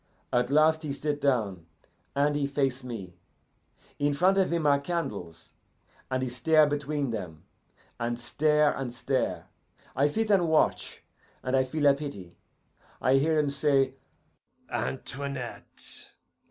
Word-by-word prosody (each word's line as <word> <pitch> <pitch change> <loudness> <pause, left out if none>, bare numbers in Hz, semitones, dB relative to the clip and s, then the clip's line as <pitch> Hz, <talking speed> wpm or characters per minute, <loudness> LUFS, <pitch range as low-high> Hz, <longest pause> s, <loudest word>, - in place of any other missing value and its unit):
At 125 0 +2
last 155 +2 +4
he 150 -3 -3
sit 145 +1 -3
down, 105 - 0 0.5
and 145 +1 +2
he 145 -1 0
face 135 -2 -1
me. 100 -8 -7 0.8
In 145 0 +1
front 190 +5 +3
of 190 - +2
him 170 -2 0
are 140 -1 +4
candles, 105 - -5 0.6
and 130 0 -1
he - - -1
stare 150 +6 +4
between 145 -2 -1
them, 90 -8 -6 0.6
and 120 0 -2
stare 150 +5 +2
and 130 -3 -4
stare. 130 +2 -1 0.5
I 140 +3 +3
sit 215 +8 0
and 185 -4 +4
watch, 160 - +1 0.4
and 130 +1 0
I 130 - +4
feel 145 +3 -2
a 140 - +7
pity. 140 -12 -7 0.6
I 130 +1 +4
hear 155 +3 +2
him 150 -2 +2
say, 140 -2 +2 0.8
'Antoinette! 125 - -3
140 Hz, 140 wpm, -28 LUFS, 125-150 Hz, 0.8 s, a